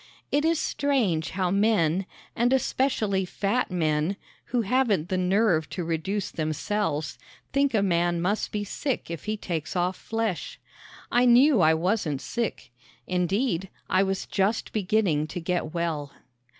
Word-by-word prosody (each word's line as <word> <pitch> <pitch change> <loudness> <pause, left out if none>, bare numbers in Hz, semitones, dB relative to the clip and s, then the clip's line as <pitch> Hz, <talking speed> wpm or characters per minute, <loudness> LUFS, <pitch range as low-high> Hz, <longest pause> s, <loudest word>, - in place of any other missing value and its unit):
It 290 +1 +2
is 330 +1 +2
strange 235 - 0
how 185 -2 +1
men, 195 -4 +2 0.3
and 240 +2 +2
especially 250 -7 +1
fat 200 +6 -1
men, 160 +1 0 0.3
who 245 -1 0
haven't 220 -7 +1
the 185 - 0
nerve 185 -4 +2
to 175 +3 -4
reduce 170 +5 -2
themselves, 155 0 -2 0.3
think 275 -2 +2
a 205 - +3
man 175 -2 +1
must 200 +5 -1
be 210 -1 -2
sick 245 - -3
if 170 - -6
he 215 0 -2
takes 170 -4 -4
off 180 +1 +1
flesh. 225 - -3 0.5
I 245 +1 +4
knew 250 -1 +6
I 160 -1 +5
wasn't 165 -4 0
sick. 230 - -4 0.3
Indeed, 185 +1 0 0.2
I 185 - +4
was 195 0 -1
just 200 +3 0
beginning 190 -7 +1
to 175 - -5
get 170 -2 -2
well. 160 -4 -2
190 Hz, 145 wpm, -26 LUFS, 170-225 Hz, 0.5 s, knew